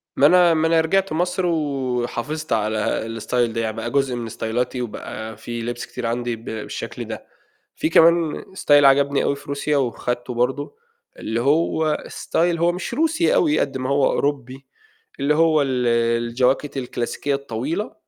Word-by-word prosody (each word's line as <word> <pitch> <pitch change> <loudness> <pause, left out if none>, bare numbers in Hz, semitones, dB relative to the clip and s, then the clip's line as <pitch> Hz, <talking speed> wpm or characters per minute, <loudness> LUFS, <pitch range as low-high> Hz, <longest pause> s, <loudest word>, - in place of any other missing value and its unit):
ما 140 - +4
أنا 175 +1 +6
ما 160 0 +2
أنا 165 0 +4
رجِعت 195 +2 +1
مصر 180 +2 0
وحافظت 140 -2 -2
على 110 -1 0 0.2
الstyle - - -8 0.2
ده، 115 - -2
يعني 110 -1 -2
بقى 120 +1 -4
جزء 135 -3 +1
من 115 -2 -5
ستايلاتي 120 +3 -2
وبقى 110 -1 -6
في 120 +1 -6
لِبس 120 +1 -4
كتير 125 - -6
عندي 120 0 -2
ب 115 - -15
بالشكل 110 -1 -6
ده، - - -7 0.5
في - - 0
كمان 165 -1 +4
style 170 - -7
عجبني 140 +1 +4
أوي 140 - 0
في - - -14
روسيا، 140 +1 -1
وخدته 120 -1 -2
برضه 130 - -1 0.4
اللي 115 +2 -2
هو 155 +2 +2
style - - -7 0.2
هو 170 +1 +2
مش 180 +6 -5
روسي 325 - +2
أوي 315 -10 +3
قد 135 -1 -1
ما 130 0 -3
هو 140 -1 +3
أوروبي، 135 -2 -2 0.5
اللي 145 +2 +2
هو 160 -2 +4
ال 130 -3 0 0.4
الجواكت 130 +4 0
الكلاسيكية 130 +2 -2
الطويلة، 140 - -3
140 Hz, 165 wpm, -22 LUFS, 120-160 Hz, 0.5 s, أنا